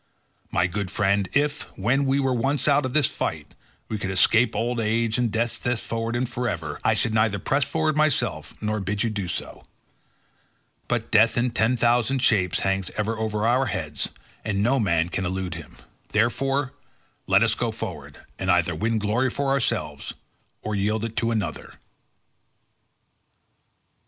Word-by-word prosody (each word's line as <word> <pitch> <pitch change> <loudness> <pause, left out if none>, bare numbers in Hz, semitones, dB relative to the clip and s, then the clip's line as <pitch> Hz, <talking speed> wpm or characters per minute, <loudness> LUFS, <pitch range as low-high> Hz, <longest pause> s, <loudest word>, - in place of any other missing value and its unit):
My 90 - +2
good 95 +1 -3
friend, 100 +1 +1
if, 145 +1 +1 0.2
when 125 +8 +2
we 135 +1 +2
were 135 -2 +1
once 135 +5 0
out 145 -2 +4
of 125 - -7
this 150 -2 +4
fight, 80 - -3 0.3
we 110 - -3
could 100 - -3
escape 110 +5 +3
old 120 +1 -1
age 115 +1 +1
and 120 -3 +1
death 115 +1 -1
thenceforward 115 -1 -2
and 125 +1 0
forever, 85 -12 -3
I - - +3
should 110 - +1
neither 110 -2 +2
press 135 +7 +1
forward 155 +2 0
myself 155 -3 0
nor 110 0 -1
bid 100 +1 -1
you 115 - 0
do 100 -4 -3
so, 85 - -6 1.2
but 120 -2 -2
death 115 +1 +5
in 120 +1 +2
ten 115 +2 +2
thousand 120 +3 +2
shapes 95 -8 +3
hangs 95 -1 0
ever 110 +1 0
over 110 -1 -1
our 125 +3 +3
heads, 75 -6 -3 0.3
and 100 -1 0
no 130 +4 +3
man 85 -6 +2
can 95 - -2
elude 95 -1 -2
him; 80 -3 -10 0.3
therefore 135 +5 +1 0.5
let 100 +3 +5
us 115 -1 +3
go 120 0 -1
forward 75 -10 -6 0.2
and 95 - -2
either 90 -1 +3
win 110 +8 0
glory 110 +5 +1
for 140 +2 -2
ourselves, 75 - -1 0.5
or 110 - -3
yield 105 +2 0
it 115 -1 -6
to 115 - +1
another." 110 -3 -3
110 Hz, 165 wpm, -24 LUFS, 95-125 Hz, 1.2 s, death